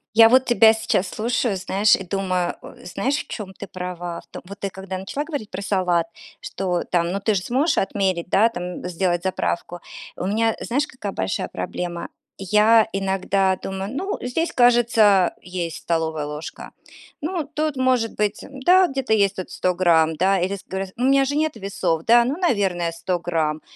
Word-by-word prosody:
Я 225 0 +8
вот 260 +2 +5
тебя 225 -2 +6
сейчас 220 -4 0
слушаю, 230 +1 -1
знаешь, 195 +3 +3
и - - -6
думаю, 185 -2 -1
э, - - -13
знаешь, 200 +10 -1
в - - -5
чём 210 -4 -6
ты - - -8
права. 175 -1 -6
В - - -24
том - - -9
вот, 200 +2 -10
ты 200 - -3
когда 190 0 -6
начала 235 +10 -4
говорить 285 -10 -5
про 185 - -6
салат, 180 -4 +1 0.3
что 180 -2 -2
там: 170 -1 0
"Ну, 195 - -2
ты 210 +2 +1
же 190 - 0
сможешь 275 - +1
отмерить, 190 -3 -1
да, 220 +5 +4
там 180 -2 -6
сделать 175 0 0
заправку". 175 -2 -2 0.4
У 180 - -4
меня, 225 +2 +1
знаешь, 275 +5 0
какая 255 -9 -6
большая 95 0 -2
проблема? 170 - -5 0.3
Я 210 +3 +4
иногда 195 0 +1
думаю: 195 +1 -4
"Ну, 385 +8 -3
здесь, 285 +7 -1
кажется, 240 -2 +4 0.3
а, - - -7
есть 175 -3 -4
столовая 160 -2 -1
ложка. 150 +2 -7 0.5
Ну, 330 +1 -2
тут, 305 -1 -1
может 255 -3 +1
быть, 210 -1 -1
э, - - -10
да, 355 +8 +4
где-то 270 -5 -1
есть 200 -2 +3
тут 185 - -6
100 180 -1 0
грамм, 160 -3 +3
да, 190 +4 +2
или 185 +3 -1
ск 195 - -13
горя 190 0 -3
у 245 - -2
меня 270 +1 +4
же 285 +2 -2
нет 310 0 0
весов, 195 -5 -2
да, 235 +1 +6
ну, 265 +4 -1
наверное, 195 - 0
100 175 +2 -2
грамм". 160 -3 -1
195 Hz, 190 wpm, -22 LUFS, 180-235 Hz, 0.5 s, Я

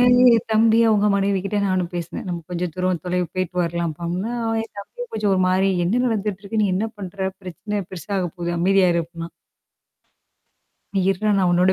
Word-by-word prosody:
என் 245 -2 +6
தம்பி, 225 +1 +5
அவங்க 210 -1 +3
மனைவிகிட்ட 195 0 0
நானும் 185 -2 0
பேசினேன். 175 +1 -5
நம்ம 170 -1 -3
கொஞ்சம் 175 -1 -2
தூரம் 185 -2 0
போயிட்டு 180 0 -2
வரலாம் 170 -1 -2
அப்படின்னா, 185 +8 -2 0.3
என் 225 - -11
தம்பியும் - - -8
கொஞ்சம் 210 -2 +1
ஒரு 185 - +1
மாதிரி, 190 +1 +3 0.2
"என்ன 230 +8 +1
நடந்துட்டு 210 -3 -1
இருக்கு? 215 +2 -2
நீ - - +3
என்ன 205 +4 0
பண்ற? 190 0 -3
பிரச்சனை 205 +4 -4
பெருசா 185 +2 -7
ஆகப் 180 0 -3
போகுது. 175 -1 -3
அமைதியா 190 +1 +4
இரு," 170 - +1
அப்படின்னான். 165 0 -8 1.7
நீ, - - +3 0.3
நான் 195 -3 +3
உன்னோட 180 +2 +4
190 Hz, 170 wpm, -22 LUFS, 175-210 Hz, 1.7 s, என்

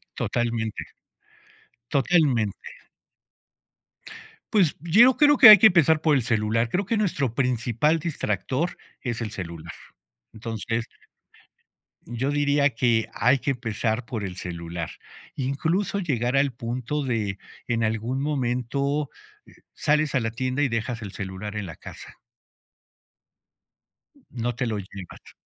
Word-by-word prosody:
Totalmente. 115 -2 -2 1.1
Totalmente. 135 - +1 1.8
Pues, 185 -8 +3
yo 225 +10 +5
creo 290 -1 +5
que 220 - +11
hay 210 - +12
que 200 - +4
empezar 160 -4 +4
por 155 -2 +3
el 130 - +2
celular. 115 0 0
Creo 185 - -1
que 230 - 0
nuestro 160 - 0
principal 125 +4 +1
distractor, 145 - -2 0.2
es 120 -3 -3
el 110 -2 -4
celular. 85 -6 -7 0.6
Entonces 115 +1 -4 1.2
yo 125 +4 -2
diría, 145 0 +2
que 115 -2 +1
hay 125 +4 +3
que 140 - -1
empezar 115 -1 -2
por 115 -3 -5
el 95 -2 -5
celular. 85 -2 -5 0.5
Incluso 160 +10 -1
llegar 125 - -1
al 140 0 +3
punto 120 +5 -3
de 110 -6 -2 0.3
en 115 -1 0
algún 115 +4 -1
momento, 140 +1 -1 0.4
eh, - - -19 0.2
sales 150 -1 +1
a - - +4
la 115 -2 -2
tienda, 130 +4 -2
y 140 - +1
dejas 115 0 -3
el 105 -3 -7
celular 95 +2 -6
en 105 -1 -3
la 80 -3 -8
casa. - - -12 2.1
No 120 -1 -3
te 125 - -2
lo 110 -2 -2
llevas. 95 -2 -11
125 Hz, 125 wpm, -25 LUFS, 110-145 Hz, 2.1 s, hay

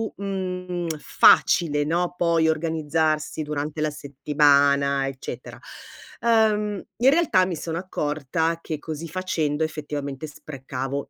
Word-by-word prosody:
mhmm, 180 -3 -4
facile, 150 -1 +4
no, 170 +4 -1
poi 170 -2 +2
organizzarsi 155 -1 0
durante 150 +1 -4
la 155 - +1
settimana 140 -1 +2
eccetera. 135 -1 -7 0.6
Ehm, 215 -3 +2 0.2
in 250 +3 +5
realtà 275 - +3
mi 180 -2 -3
sono 165 +1 -4
accorta 160 -1 -2
che 155 - -4
così 155 +2 -6
facendo 160 -3 -1
effettivamente 150 -2 -4
sprecavo 135 -2 -6
155 Hz, 110 wpm, -24 LUFS, 145-180 Hz, 0.6 s, in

